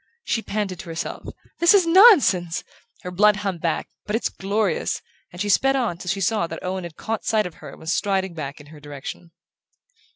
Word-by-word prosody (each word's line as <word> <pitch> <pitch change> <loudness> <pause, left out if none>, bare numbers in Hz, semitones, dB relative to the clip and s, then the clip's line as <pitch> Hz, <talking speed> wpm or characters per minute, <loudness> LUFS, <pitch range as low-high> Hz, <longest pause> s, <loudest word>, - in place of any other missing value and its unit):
She 225 - -1
panted 205 -5 -3
to 185 - -9
herself: 165 0 -5 0.3
"This 340 +4 +6
is 380 -3 +5
nonsense!" 325 - +5 0.4
her 180 - -5
blood 210 +3 +4
hummed 195 -5 -3
back: 165 -2 -1 0.2
"But 210 - -1
it's 230 - 0
glorious!" 200 -2 -1 0.3
and 175 - -11
she 205 - -1
sped 270 +7 +3
on 230 -10 -1
till 180 - -6
she 195 +2 -1
saw 210 -2 +1
that 165 0 -8
Owen 185 0 -3
had 170 -2 -9
caught 225 0 -4
sight 215 -1 +1
of 180 - -6
her - - -8
and - - -13
was 160 +2 -2
striding 190 -2 0
back 145 -3 -6
in 145 - -13
her 150 - -12
direction. 145 +3 -8
190 Hz, 205 wpm, -23 LUFS, 170-215 Hz, 0.4 s, This